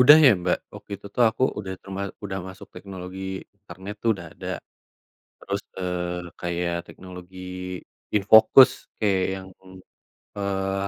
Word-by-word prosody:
udah 145 +5 +10
ya, - - +10
Mbak. 90 - +2 0.2
Waktu - - -12
itu - - -11
tuh 125 - +3
aku 110 +3 -5 0.2
udah 95 -2 -4
terma 95 0 -6 0.2
udah 95 -1 -3
masuk 95 +1 -10
teknologi 95 -1 -8 0.4
internet 100 0 -9
tuh 115 - +1
udah 90 -3 -9
ada. - - -9 0.9
Terus, 100 +1 -3 0.2
eee, 90 -1 -3
kayak 85 0 -1
teknologi 90 0 -11 0.8
InFocus, 110 +6 +8 0.3
kayak 100 -3 +2
yang, 95 0 -8 0.9
eee, 95 0 -1
95 Hz, 130 wpm, -25 LUFS, 90-100 Hz, 0.9 s, udah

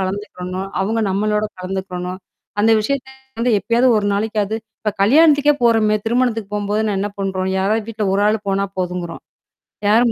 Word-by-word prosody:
கலந்துக்கிறணும், 190 -1 -4 0.2
அவுங்க 225 +3 0
நம்மளோட 210 +2 +1 0.2
கலந்துக்கிறணும். 185 -1 -4 0.4
அந்த 225 +2 +4
விஷயத்த 265 +4 -2 0.3
வந்து 245 +1 +2
எப்பயாவது 240 +5 +2
ஒரு 205 - -1
நாளைக்காவது 215 0 -1 0.2
இப்ப 215 - 0
கல்யாணத்துக்கே 295 +4 +5
போறோமே, 220 -2 +4
திருமணத்துக்கு 225 -3 0
போம்போது 205 +1 -1
நான் 205 -2 0
என்ன 205 +1 -2
பண்றோம்? 190 -1 -1
யாராவது 210 +3 0
வீட்ல 215 -2 -2
ஒரு 200 - +2
ஆள் 215 0 +1
போனா 195 0 +1
போதுங்கறோம். 180 -2 -4 0.7
யாரும் 230 +3 +4
210 Hz, 150 wpm, -19 LUFS, 195-225 Hz, 0.7 s, கல்யாணத்துக்கே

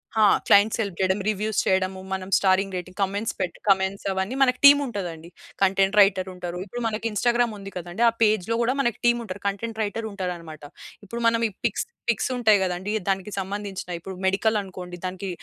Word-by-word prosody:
హా! 220 - +4 0.2
Clients 205 +3 +5
help 200 -5 -3
చేయడం. 190 +1 +1
Reviews 215 0 0
చేయడము. 190 0 +1
మనం 190 0 -4
స్టారింగ్ 195 0 +2
రేటింగ్ 185 +2 -8
కామెంట్స్ 200 +3 -1
పెట్టి 180 -2 -3
కామెంట్స్ 195 0 +2
అవన్నీ 190 +6 -2
మనకు 250 -1 +3
టీమ్ 285 0 +9
ఉంటదండి. 175 -8 -6 0.3
కంటెంట్ 195 +1 +2
రైటర్ 190 -1 +3
ఉంటారు. 180 -1 -6
ఇప్పుడు 240 +4 -6
మనకి 220 0 -4
ఇన్స్టాగ్రామ్ 235 +1 +1
ఉంది 195 0 -9
కదండీ! 175 +5 -6
ఆ - - -2
పేజ్‌లో 215 0 +2
గూడా 240 +2 +2
మన 265 - +3 0.2
టీమ్ 240 0 +3
ఉంటరు. 190 0 -7
కంటెంట్ 220 +3 -4
రైటర్ 220 +2 -3
ఉంటారన్నమాట. 175 -5 -6 0.4
ఇప్పుడు 235 +4 -6
మనం 230 0 +2
ఈ - - -14
పిక్స్ - - 0 0.2
పిక్స్ 235 +2 +1
ఉంటాయి 220 -4 +4
గదండీ! 185 +3 -2 0.2
దానికి 195 +1 -1
సంబంధించినయి 195 -2 -5
ఇప్పుడు 190 +1 -7
మెడికల్ 210 +3 +2
అనుకోండి. 180 -2 -9
దానికి 185 +1 -4
195 Hz, 180 wpm, -24 LUFS, 185-220 Hz, 0.4 s, టీమ్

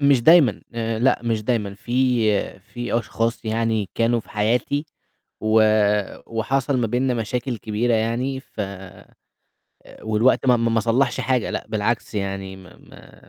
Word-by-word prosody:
مش 140 -3 +4
دايمًا، 155 - +6
آآ، 115 -1 -2
لأ 130 +3 +2
مش 115 -2 -1
دايمًا. 105 -4 -1
في 120 -2 0
في 120 +3 -3
أشخاص 115 +1 -2
يعني 110 -2 0
كانوا 115 0 +1
في - - -19
حياتي 120 +8 0 0.5
و 110 0 +4 0.6
وحصل 130 +4 -1
ما 120 - +1
بيننا 125 +3 0
مشاكل 120 +2 -2
كبيرة 115 +3 0
يعني، 120 +4 -1
ف 110 - -10 1.4
والوقت 110 +5 +2
ما 125 -1 +5
ما 115 0 0
ما 115 - +2
صلَّحش 125 +3 +1
حاجة، 130 -3 0
لأ، - - -3
بالعكس 110 +1 -2
يعني 95 -1 -4
ما 90 -1 -15
ما - - -17
115 Hz, 145 wpm, -22 LUFS, 110-125 Hz, 1.4 s, دايمًا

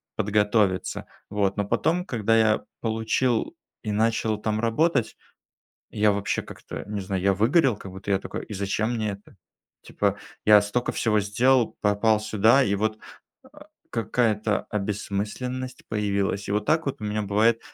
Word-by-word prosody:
подготовиться, 105 -2 +1 0.2
вот. 100 -1 0
Но 105 - 0
потом, 170 - 0
когда 115 - +1
я 110 -1 +3 0.2
получил 115 +4 0 0.3
и 105 - -3
начал 110 0 +1
там 110 0 -1
работать, 120 +3 +1 0.7
я 105 0 +2
вообще 100 0 -1
как-то - - -9
не 105 0 -4
знаю, 95 -1 -3
я 100 0 +3
выгорел 125 - +3
как 95 - -10
будто 95 +2 -7
я 95 - +3
такой: - - -6
"И 105 - -7
зачем 100 +4 -1
мне 110 -2 -1
это?" 100 0 -11 0.5
Типа - - -1 0.3
я 105 -1 +8
столько 115 +4 -1
всего 105 -2 +1
сделал, 120 +4 +2
попал 105 +1 +3
сюда 110 +5 +4
и 100 - +1
вот, 110 +2 -1 0.5
э, - - -17 0.4
какая-то 110 -2 0
обессмысленность 105 +5 -3
появилась. 100 -2 -1
И - - -1
вот 105 0 0
так 160 0 +2
вот 140 - -3
у - - -3
меня 105 +1 -1
бывает 110 +3 +2
105 Hz, 155 wpm, -25 LUFS, 100-115 Hz, 0.7 s, я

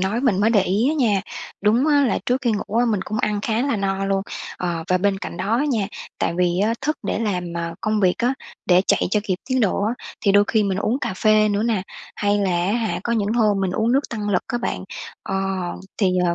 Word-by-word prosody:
nói 195 +5 0
mình 230 -8 +2
mới 215 +2 +4
để 210 -4 +4
ý 205 +8 +1
á 305 - +1
nha, 225 -10 +2 0.4
đúng 225 +7 +3
á 290 -2 +4
là - - +1
trước 250 +2 +1
khi 240 -3 +2
ngủ 210 +1 -3
á, 245 - +4
mình 215 -5 +1
cũng 215 - -3
ăn 210 -1 0
khá 225 +3 0
là 280 -4 0
no 195 -1 -1
luôn. 195 0 0 0.3
Ờ, 170 -2 -3
và 185 -1 +3
bên 195 +1 +1
cạnh 170 - -6
đó 200 +6 0
á 285 - +1
nha, 230 -9 0 0.3
tại - - 0
vì 175 -1 +2
á 215 +3 +2
thức 300 +3 -1
để - - -1
làm, 200 -6 -1
ờ, 170 0 -3
công 215 0 0
việc 185 -2 +3
á, 245 +3 +1 0.3
để 180 0 +5
chạy - - +3
cho 210 - +2
kịp 185 - 0
tiến 260 -1 +1
độ 200 -2 +1
á, 220 +3 0 0.3
thì 200 - +3
đôi 205 +1 +6
khi 220 -2 +2
mình 195 -1 -1
uống 235 +5 0
cà - - -2
phê 215 +2 +4
nữa 205 +1 0
nè, 225 -5 +1 0.3
hay 205 0 +1
là 195 -2 +1
á 175 +2 +1
hả 225 -4 -1
có 235 - 0
những 215 -2 +1
hôm 215 -4 +2
mình 190 -1 0
uống 220 +5 +1
nước 275 +2 +1
tăng 210 -3 -3
lực 180 -3 +2
á 240 - -2
bạn. 210 - -3 0.4
Ờ, 195 - -4 0.6
thì, 190 -4 +2
ờ, 170 -1 +1
210 Hz, 260 wpm, -22 LUFS, 195-230 Hz, 0.6 s, đôi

